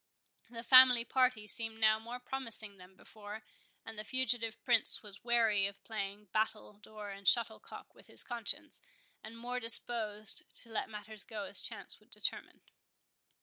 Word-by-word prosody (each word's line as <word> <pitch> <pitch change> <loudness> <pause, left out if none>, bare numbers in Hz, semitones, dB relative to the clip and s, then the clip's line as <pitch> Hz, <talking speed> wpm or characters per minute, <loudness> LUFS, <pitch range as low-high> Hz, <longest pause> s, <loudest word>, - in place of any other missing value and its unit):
The 230 -1 -9
family 255 -2 +7
party 255 -4 0
seemed 225 +1 -3
now 215 0 +3
more 235 +3 -9
promising 230 -5 -3
than 180 +1 -17
before, 210 +2 -12 0.4
and 225 -1 -10
the - - -6
fugitive 240 -2 -2
Prince 235 -3 +5
was 200 -2 -13
weary 225 -4 +1
of 200 0 -13
playing 205 -2 -7
battledore 215 -1 -5
and 200 -1 -13
shuttlecock 225 0 0
with - - -20
his - - -3
conscience, 235 -4 -5 0.4
and 225 +1 -11
much 245 +1 -5
disposed 220 -2 +4 0.2
to 230 - -11
let 225 - -4
matters 210 -1 -9
go 210 0 -7
as 195 +1 0
chance - - -8
should - - -28
determine. - - -7
220 Hz, 150 wpm, -32 LUFS, 210-235 Hz, 0.4 s, family